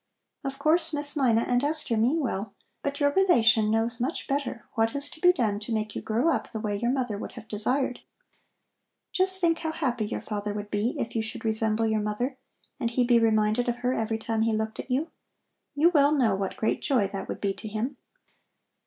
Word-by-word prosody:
Of 275 -1 -4
course, 320 +3 +3
Miss 290 0 +3
Mina 240 -6 +3
and 245 +2 0
Esther 300 -5 +2
mean 250 +9 +2
well, 205 -6 -3 0.3
but 280 0 -3
your 285 -1 +3
relation 230 - +4
knows 225 +2 0
much 265 +7 -2
better 275 -4 -3
what 225 +2 0
is 280 +1 -1
to - - -12
be 360 - +7
done 215 - -1
to 215 +2 -7
make 215 -1 -2
you - - -3
grow 235 +9 +1
up - - -3
the 220 - -5
way 210 -1 -2
your 235 +4 -1
mother 245 -6 -1
would - - -7
have 230 -3 -11
desired. 250 +5 0 1.1
Just 375 0 +4
think 335 -2 +2
how 320 -1 -2
happy 245 -9 -2
your - - -3
father 205 -1 -4
would 205 0 -6
be 210 +4 0
if 230 - -4
you 225 - +1
should 220 +1 -6
resemble 220 0 +2
your 220 -1 +1
mother 210 +6 -2 0.4
and 235 -4 0
he 245 +1 +1
be 240 -1 +4
reminded 220 +1 +2
of 240 - 0
her 250 - +2
every 225 -2 -1
time 220 0 -2
he 225 0 +2
looked 220 0 -3
at - - -7
you. 280 +6 -1 0.6
You 320 +4 +4
well 290 -3 +4
know 255 -9 +3
what 195 -1 -3
great 220 - 0
joy 250 -9 +2
that 195 0 -6
would - - -5
be 200 -1 -1
to 215 - -8
him." 225 +6 -3
235 Hz, 215 wpm, -27 LUFS, 220-280 Hz, 1.1 s, be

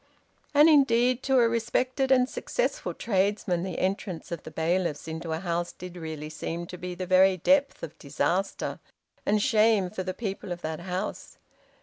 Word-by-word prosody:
And 295 +2 +8
indeed, 255 -4 +4
to 265 -1 +3
a 235 -2 +5
respected 250 +3 0
and 255 -1 +5
successful - - -2
tradesman, 195 -4 0
the 185 -1 -4
entrance 185 -3 -3
of 170 -3 -4
the - - -9
bailiffs 160 0 -1
into 160 +1 -5
a 160 - 0
house 175 -1 -2
did 180 0 -9
really 160 -3 -6
seem 165 +2 -5
to - - -5
be 180 0 -5
the 185 +1 -4
very 185 +1 +5
depth 280 - +2
of 160 - -6
disaster 175 +7 -1 0.5
and 210 +1 +3
shame 215 -4 +3
for 200 - -4
the 185 0 -4
people 195 -4 -5
of 175 0 -4
that 155 0 -3
house. 180 +1 -5
185 Hz, 175 wpm, -27 LUFS, 170-230 Hz, 0.5 s, And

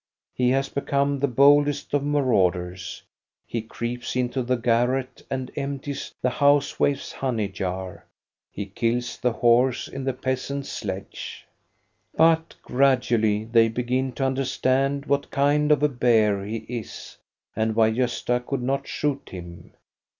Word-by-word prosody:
He 125 -1 +2
has 135 +1 +1
become 140 0 0
the 140 - +2
boldest 145 +3 +4
of 145 -1 +2
maraud 130 -11 +2
ers: 90 0 -7 0.4
he 115 - -3
creeps 120 +2 -5
into 125 +1 0
the 125 +1 0
garret 125 +2 0
and 130 -1 -3
empties 140 0 -4
the 125 - +2
house 145 +1 +2
wife's 140 -1 0
honey 120 -6 -1
jar; 95 -1 -5 0.4
he 100 - -5
kills 115 +4 -2
the 125 - +1
horse 120 +2 +3
in 135 - -6
the 135 0 0
peasant's 130 +2 -3
sledge. 95 -2 -6 0.7
But 160 0 +3
gradually 120 -5 +2
they 115 0 +4
begin 125 +3 -1
to 135 - -1
understand 135 +1 0
what 140 -1 0
kind 145 +2 +2
of 150 -1 +3
a 150 - +4
bear 110 -6 +2
he 110 +1 -5
is 120 -2 -7 0.4
and 110 0 0
why 110 -1 +4
Gosta 125 +1 0
could 130 0 -3
not 135 +2 -1
shoot 145 -2 -2
him. 85 -2 -10
125 Hz, 145 wpm, -24 LUFS, 115-140 Hz, 0.7 s, boldest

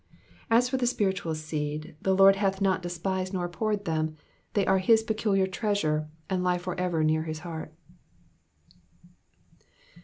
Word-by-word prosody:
As 235 +2 +4
for 260 +1 -1
the 250 -1 0
spiritual 190 -8 0
seed, 155 -1 -4
the 190 0 +2
Lord 195 +1 +7
hath 195 -1 0
not 195 -2 +2
despised 185 +2 -3
nor 180 -1 -1
abhorred 205 +3 -2
them; 155 -2 -1 0.4
they 200 -2 +3
are 190 0 +3
his 220 +4 +4
peculiar 215 -3 +1
treasure 180 -6 -1 0.2
and 185 -2 -1
lie 180 0 +2
for 180 0 -4
ever 175 -3 0
near 155 0 +2
his 155 -1 -5
heart. 160 -2 -6
185 Hz, 150 wpm, -28 LUFS, 160-200 Hz, 0.4 s, Lord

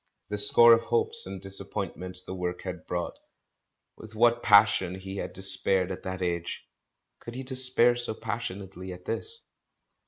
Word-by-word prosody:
The 105 - -4
score 115 +3 +7
of 115 - +2
hopes 120 -5 0
and 95 0 -8
disappoint 95 0 -5
ments 90 0 -8
the 95 - -8
work 90 -1 -5
had 90 -3 -8
brought; 85 -1 -5 0.8
with 110 0 -14
what 120 +1 +2
passion 100 -4 +3
he 95 +1 -9
had - - -6
despaired 95 0 +5
at 95 - -7
that 95 0 -6
age! 85 -1 -4 0.5
Could 120 - -11
he 130 - -6
despair 125 -2 +2
so 120 -2 -5
passionately 95 -5 -7
at 90 0 -14
this? 460 +1 -6
95 Hz, 160 wpm, -26 LUFS, 90-115 Hz, 0.8 s, score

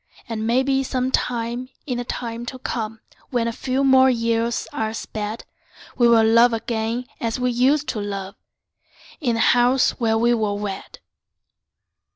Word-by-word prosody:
And 220 -1 -3
maybe 265 +3 +2
some 260 -1 -1
time 240 0 -1 0.2
in 250 -5 -2
the - - -2
time 235 -1 -5
to 260 - -5
come, 225 -3 -4 0.3
When 240 -3 0
a - - 0
few 260 +3 -1
more 265 -1 +6
years 230 -1 0
are 220 0 -2
sped, 215 0 -5 0.5
We'll 235 -2 +5
love 230 +2 +5
again 225 +1 -2
as 230 +1 -2
we 250 0 +1
used 270 +5 +2
to 220 - -2
love, 200 -1 -5 0.9
In 245 -8 0
the - - -2
house 245 +2 +3
where 225 -2 +2
we 235 +1 +3
were 215 -3 0
wed. 205 -2 -6
235 Hz, 155 wpm, -22 LUFS, 225-250 Hz, 0.9 s, more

